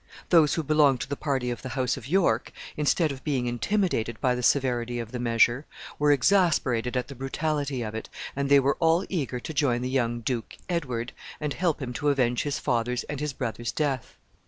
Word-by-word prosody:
Those 160 -4 +5
who 165 - -1
belonged 145 -3 +4
to - - -3
the 145 - -3
party 135 -4 -1
of 120 - -5
the 130 - -6
house 130 -2 +1
of 130 -2 -9
York, 160 -9 +2 0.2
instead 150 +1 +2
of 135 -1 -8
being 135 -5 0
intimidated 120 - 0
by 125 - +2
the 125 - -2
severity 120 -2 +1
of 115 -1 -5
the 125 - -4
measure, 120 +3 +2 0.3
were 150 0 +4
exasperated 140 - +2
at 125 - -1
the - - -8
brutality 140 0 -2
of 110 -1 -5
it, 110 - -6 0.3
and 140 0 -1
they 140 0 +7
were 140 +1 +1
all 165 +3 +3
eager 140 -9 -2
to 160 - -6
join 135 -5 +1
the 125 - -2
young 120 -3 0
duke, 115 0 -3
Edward, 125 -9 -2 0.3
and 150 -2 -2
help 170 -4 0
him 125 -1 -4
to 145 +4 0
avenge 125 -4 +2
his 145 -1 -2
father's 120 -1 0
and 150 -2 -5
his 150 0 -2
brother's 120 -2 -3
death. 140 -5 -2
135 Hz, 205 wpm, -27 LUFS, 120-150 Hz, 0.3 s, they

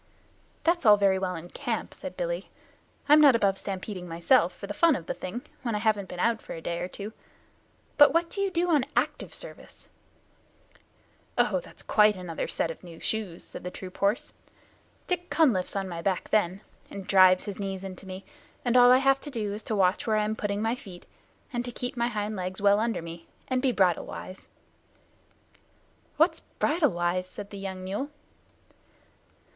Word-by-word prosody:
"That's 345 +1 +2
all 210 -2 +7
very 195 -1 +3
well 185 -1 -2
in 165 +2 -9
camp," - - -3
said - - -8
Billy. - - -3 0.6
"I'm 300 +1 +7
not 280 -5 +8
above 195 -3 +2
stampeding 190 -1 -5
myself, 170 +10 +3
for - - -9
the - - -5
fun 335 -4 +4
of 165 - -6
the - - -2
thing, 230 +7 -6 0.2
when 235 -4 -2
I - - +1
haven't 210 -3 0
been 180 - -7
out 230 +3 +1
for - - -8
a - - -6
day 170 +1 -3
or 180 - -2
two. 200 +3 -8 0.9
But 290 0 +9
what 335 +1 +2
do 395 - -2
you 395 - +1
do 350 -1 0
on 295 -5 +4
active - - -1
service?" - - -9 1.5
"Oh, - - +3
that's - - -12
quite 210 -1 +4
another 180 -3 -4
set 165 - -1
of 165 - -12
new 170 -2 -11
shoes," 205 -6 -3
said - - -9
the 180 - -3
troop 185 0 -9
horse. 200 +3 +1 0.7
"Dick 355 -1 -2
Cunliffe's 240 - +2
on 195 -1 -1
my 170 -2 -5
back 185 0 -1
then, 195 -2 +2 0.3
and 195 -1 -7
drives 185 -1 +6
his 205 -1 -6
knees 195 -1 -4
into 190 0 -8
me, 185 +1 -8 0.4
and 245 0 +1
all 245 0 +8
I 255 - +8
have 270 +1 +3
to 295 - -5
do 215 -6 -3
is 210 - -5
to 220 - -1
watch 190 +1 +2
where 215 -1 +3
I 210 - +2
am 215 +1 -1
putting 205 0 -2
my 225 +1 +1
feet, 190 -8 -10 0.5
and 240 0 -1
to 245 - -6
keep 245 +1 -5
my 235 -1 +1
hind 215 -2 -3
legs 185 -1 -4
well 200 0 +4
under 225 -5 -1
me, 165 0 -9 0.2
and 255 -1 +1
be 265 -1 +2
bridle 185 -6 +2
wise." 185 - -9 1.7
"What's - - +3
bridle 300 -1 +1
wise?" 175 +1 0
said 200 +2 -9
the 200 - -7
young 190 -1 -5
mule. 205 +10 -3
205 Hz, 195 wpm, -27 LUFS, 185-245 Hz, 1.7 s, But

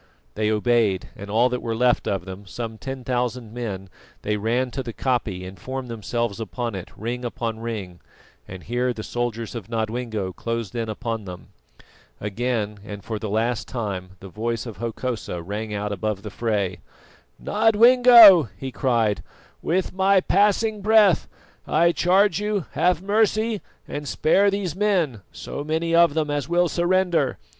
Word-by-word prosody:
They 105 0 0
obeyed, 110 -3 +1
and 100 -1 -9
all 115 +4 +3
that 125 0 -3
were 115 -1 -2
left 125 +1 +2
of 95 -3 -1
them, 95 +1 -9
some 110 +3 -6
ten 135 -1 -6
thousand 125 -2 -2
men, 105 -6 -5 0.4
they 105 - 0
ran 120 +4 0
to 135 - -3
the 120 -3 -6
koppie 110 -6 -1
and 95 0 -10
formed 130 +4 -5
themselves 115 0 -3
upon 115 +3 -4
it, 95 -2 -6
ring 120 +3 -4
above 115 -2 -3
ring, 105 -6 -6 0.5
and 95 -1 -9
here 125 +2 -1
the 110 - -7
soldiers 115 -2 -3
of 115 -4 -7
Nodwengo 110 -4 -3
closed 115 -4 -4
in 115 -2 -3
upon 115 -1 -4
them. 90 -1 -9 0.7
Again 105 0 -2
and 105 -1 -8
for 110 -2 -4
the 110 - -4
last 115 +2 -1
time 95 -6 -5
the 95 - -9
voice 115 +4 -3
of 115 -5 -8
Hokosa 115 -3 -4
rang 105 +4 -5
out 105 0 -3
above 100 0 -3
the 105 - -7
fray. 100 -5 -1 0.6
"Nodwengo," 225 - +7
he 135 -1 -5
cried, 115 -6 +1 0.4
"with 180 +2 -1
my 190 +1 +4
passing 210 +3 +2
breath 210 -3 +4 0.4
I 170 +2 +4
charge 185 +2 +3
you 210 -5 -1
have 175 +4 +1
mercy 215 +1 +1 0.3
and 145 0 -5
spare 195 +9 +3
these 195 -5 -2
men, 180 - +1
so 145 - -6
many 160 +2 -1
of 170 -2 +5
them 155 -2 0
as 145 +1 -2
will 175 +1 +3
surrender. 175 -5 +1
120 Hz, 160 wpm, -23 LUFS, 105-165 Hz, 0.7 s, Nodwengo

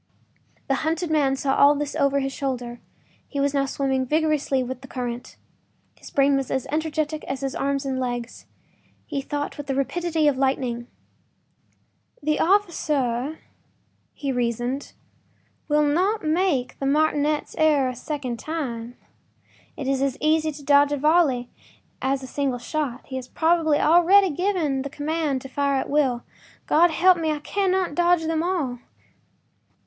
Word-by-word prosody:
The 270 - +1
hunted 325 +1 -1
man 280 -3 +2
saw 270 0 0
all 285 +1 +6
this 290 0 -3
over 280 0 +2
his 270 0 -3
shoulder; 245 -4 -4 0.5
he 280 - -4
was 280 0 +1
now 275 -1 +1
swimming 265 -1 0
vigorously 300 -2 +1
with 255 0 -6
the 270 - -11
current. 245 -2 -5 0.6
His - - -13
brain 280 0 +3
was 270 -1 -1
as 265 -2 -1
energetic 310 0 -1
as 270 0 -4
his 270 -1 -2
arms 275 0 -1
and 265 -1 -2
legs; 245 -2 -4 0.6
he 285 -3 -3
thought 290 +1 -4
with 290 - -6
the 270 - -1
rapidity 320 +3 0
of 275 -3 +2
lightning: 255 -3 -1 1.4
“The 305 +1 +1
officer,” 305 - +1 0.8
he 280 -2 -3
reasoned, 245 +2 -2 0.7
“will 300 0 +3
not 365 +9 +1
make 310 -6 0
that 275 - -2
martinet’s 300 0 +1
error 300 -4 +4
a 255 - -5
second 255 -2 -4
time. 245 -7 -4 0.8
It 275 - -4
is 270 -1 +1
as 275 -1 0
easy 310 +1 +2
to 285 0 -11
dodge 285 0 +5
a 290 - 0
volley 285 -5 +2 0.5
as 270 0 0
a - - -6
single 275 -2 -1
shot. 275 -1 -3
He 260 - -6
has 255 -1 -6
probably 320 0 +2
already 350 +4 +5
given 320 -5 0
the 280 - -5
command 290 -2 -2
to - - -7
fire 280 +1 0
at 265 - -2
will. 265 -5 +1 0.4
God 345 +3 +4
help 355 +2 +4
me, 320 -1 0
I 305 - 0
cannot 375 +1 0
dodge 345 0 +2
them 320 0 0
all! 325 -9 -1
285 Hz, 155 wpm, -24 LUFS, 265-315 Hz, 1.4 s, all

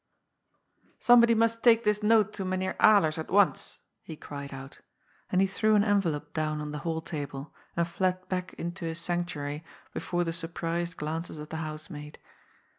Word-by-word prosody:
" - - -43
Somebody 235 -1 +6
must 230 0 +2
take 230 -1 +5
this 210 -1 +1
note 215 -1 +4
to 200 - -3
Mynheer 185 0 -1
Alers 170 -8 +5
at 160 - -5
once," 200 0 +2 0.2
he 160 - -8
cried 140 -2 -8
out. 135 0 -9 0.5
And 185 - +3
he - - +5
threw 215 +3 +2
an 205 - +5
envelope 195 -8 0
down 155 -1 -1
on 150 0 -4
the 150 - -4
hall 160 0 -2
table, 145 -2 -6 0.2
and 170 0 +2
fled 185 +1 -1
back 180 0 -3
into 175 +1 -5
his 165 0 -3
sanctuary 165 -4 -3 0.3
before 175 0 -1
the 165 -1 -2
surprised 170 +1 -3
glances 160 +2 -4
of 150 0 -8
the 160 - -4
housemaid. 155 -1 -6
170 Hz, 175 wpm, -29 LUFS, 155-195 Hz, 0.5 s, Somebody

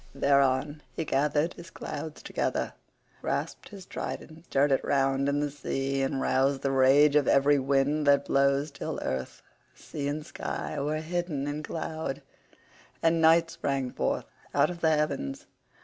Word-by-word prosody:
Thereon 140 +1 +2
he 165 - -2
gathered 150 +4 +1
his 170 +1 -11
clouds 160 -2 -7
together, - - -2 0.5
grasped - - -3
his 195 -3 -10
trident, 160 -2 -6
stirred 140 -1 +2
it 135 - +2
round 135 0 +1
in 145 0 +1
the 145 -1 -1
sea, 135 -1 -2
and 135 0 0
roused 135 +1 +1
the 135 - +1
rage 135 +3 +5
of 145 -3 +4
every 140 +1 +4
wind 140 +2 +1
that 140 0 +5
blows 140 +2 +2
till - - -5
earth, 65 -1 -4 0.3
sea, 140 -1 -5
and 150 +1 -3
sky 150 - -4
were 150 +2 -1
hidden 165 -3 -2
in 145 +1 -3
cloud, 160 -2 -4 0.8
and 165 0 +3
night 165 +1 +5
sprang 140 -6 -2
forth - - -1 0.3
out - - +4
of 170 -1 -9
the 160 - +4
heavens. 275 - -1
145 Hz, 155 wpm, -28 LUFS, 135-160 Hz, 0.8 s, rage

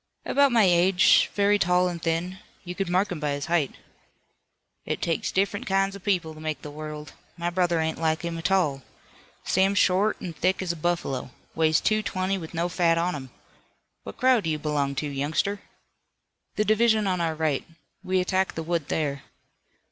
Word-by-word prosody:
"About 280 -1 +3
my 230 -2 +5
age. 180 0 +4
Very 205 0 +3
tall 180 0 +3
and 175 -2 -4
thin. 170 +3 -2 0.2
You 180 -1 -6
could 190 0 -3
mark 185 +3 +1
him 175 - -4
by 150 -1 -1
his 140 0 -4
height." 165 -5 0 1.1
"It - - -3
takes 165 -2 -1
different 200 +1 -1
kinds 195 0 +1
of 200 - -11
people 180 -6 0
to 155 - -13
make 155 -3 -4
the 150 - -7
world. 150 -1 -8 0.2
My 170 0 -2
brother 175 -2 +1
ain't 160 0 -2
like 160 0 0
him 170 0 -3
a 165 - -5
tall. 165 -7 +1 0.6
Sam's 195 +2 +2
short, 195 +3 +3
an' 175 - -6
thick 185 +4 0
as 180 - -1
a - - -5
buffalo. 165 -6 -2 0.2
Weighs 160 -1 +3
two 215 0 +1
twenty 190 -1 -2
with 165 0 -9
no 170 +1 0
fat 170 -2 +2
on 175 +2 0
him. 130 -3 -7 0.7
What - - -10
crowd 255 -6 +3
do - - 0
you 155 - 0
belong 145 -2 -1
to, 150 +2 -2
youngster?" 150 +8 -1 0.9
"The 210 - +1
division 215 0 +3
on 185 -2 0
our 165 -1 -1
right. 155 -3 0 0.4
We 185 0 +1
attacked 190 +1 0
the 165 - -3
wood 165 -2 -2
there." 140 -3 -2
175 Hz, 190 wpm, -25 LUFS, 155-190 Hz, 1.1 s, my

